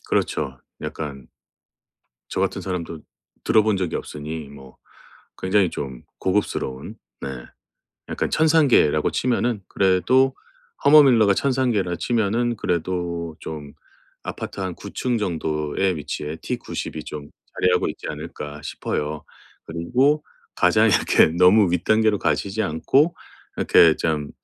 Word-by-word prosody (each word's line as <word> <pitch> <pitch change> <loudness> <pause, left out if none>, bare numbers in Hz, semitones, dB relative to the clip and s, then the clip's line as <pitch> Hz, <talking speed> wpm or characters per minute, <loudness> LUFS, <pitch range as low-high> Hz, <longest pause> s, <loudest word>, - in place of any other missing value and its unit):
그렇죠. 65 -2 -1 0.2
약간. 70 -5 -6 1.0
저 - - -3
같은 - - -1
사람도 85 -4 -4 0.4
들어본 110 -2 +3
적이 90 -3 -2
없으니 75 0 -6
뭐 65 -2 -14 0.6
굉장히 95 -1 +2
좀 65 -3 -6 0.2
고급스러운 95 -9 -2 0.3
네 - - -3 0.8
약간 - - -2
천상계라고 150 - +3
치면은 120 -3 0
그래도 125 +8 +3 0.5
허먼 145 0 +8
밀러가 110 -6 +5
천상계라 120 -9 0
치면은 115 +4 0
그래도 85 -2 -2
좀 75 -2 -7 0.5
아파트 - - -6
한 95 -2 -3
9 100 - -10
층 125 -2 -1
정도의 80 -1 -1
위치에 75 +1 -5
T90이 80 - -5
좀 75 -1 -8 0.3
자리하고 - - +2
있지 - - -7
않을까 75 0 -7
싶어요. 75 0 -4 0.4
그리고 125 - +1 0.3
가장 - - +4
이렇게 - - +4
너무 90 +4 +5
윗단계로 110 +4 +2
가시지 95 +7 -1
않고 130 - +2 0.4
이렇게 80 -2 +5
참 75 -3 -2
90 Hz, 265 characters per minute, -22 LUFS, 75-110 Hz, 1.0 s, 허먼